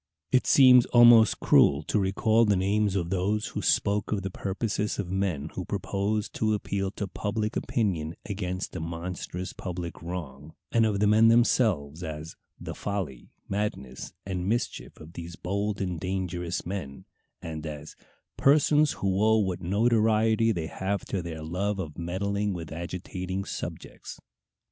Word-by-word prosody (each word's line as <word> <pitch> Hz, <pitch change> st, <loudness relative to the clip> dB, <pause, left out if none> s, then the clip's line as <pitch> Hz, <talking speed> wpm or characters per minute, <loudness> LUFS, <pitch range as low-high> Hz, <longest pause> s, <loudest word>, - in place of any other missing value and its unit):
It 130 Hz, -, +3 dB
seems 125 Hz, -3 st, +7 dB
almost 120 Hz, -2 st, +7 dB
cruel 70 Hz, +1 st, +4 dB
to 105 Hz, -, 0 dB
recall 110 Hz, +4 st, +2 dB
the 105 Hz, -3 st, +3 dB
names 100 Hz, +2 st, +1 dB
of 85 Hz, -2 st, -1 dB
those 100 Hz, +3 st, 0 dB
who -, -, -4 dB
spoke 100 Hz, 0 st, +1 dB
of 100 Hz, -3 st, -1 dB
the 95 Hz, -, -3 dB
purposes 105 Hz, +2 st, -2 dB
of 95 Hz, -4 st, -4 dB
men 90 Hz, -6 st, -1 dB
who 90 Hz, -, -4 dB
proposed 100 Hz, +2 st, -2 dB
to 110 Hz, -1 st, +2 dB
appeal 100 Hz, -1 st, -2 dB
to 100 Hz, -, -3 dB
public 105 Hz, +3 st, -3 dB
opinion 85 Hz, -8 st, -1 dB
against 95 Hz, -3 st, -4 dB
a -, -, -3 dB
monstrous 85 Hz, +2 st, -5 dB
public 90 Hz, -2 st, -6 dB
wrong, 80 Hz, -4 st, -7 dB, 0.2 s
and 115 Hz, -1 st, +4 dB
of 100 Hz, -2 st, -1 dB
the -, -, +4 dB
men 110 Hz, +2 st, +5 dB
themselves, 105 Hz, -, +2 dB
as 80 Hz, -1 st, -6 dB, 0.2 s
"the -, -, -6 dB
folly, 95 Hz, -10 st, -4 dB, 0.2 s
madness, 100 Hz, -11 st, -4 dB
and 95 Hz, -1 st, -3 dB
mischief 120 Hz, +2 st, -2 dB
of 80 Hz, +2 st, -12 dB
these 85 Hz, 0 st, -7 dB
bold 100 Hz, +2 st, -2 dB
and 90 Hz, -4 st, -2 dB
dangerous 90 Hz, -1 st, -3 dB
men," 85 Hz, -7 st, -6 dB, 0.3 s
and 80 Hz, -1 st, -6 dB
as 75 Hz, 0 st, -8 dB, 0.4 s
"persons 150 Hz, +1 st, +4 dB
who 95 Hz, +1 st, 0 dB
owe 110 Hz, 0 st, +5 dB
what 95 Hz, -4 st, -1 dB
notoriety 110 Hz, +3 st, +3 dB
they 85 Hz, -6 st, -2 dB
have 95 Hz, +4 st, -3 dB
to 95 Hz, -, -2 dB
their 80 Hz, -2 st, -6 dB
love 95 Hz, +6 st, -2 dB
of 85 Hz, -4 st, -6 dB
meddling 100 Hz, +4 st, -1 dB
with 80 Hz, -4 st, -7 dB
agitating 90 Hz, +3 st, -5 dB
subjects." -, -, -7 dB
95 Hz, 155 wpm, -27 LUFS, 85-105 Hz, 0.4 s, seems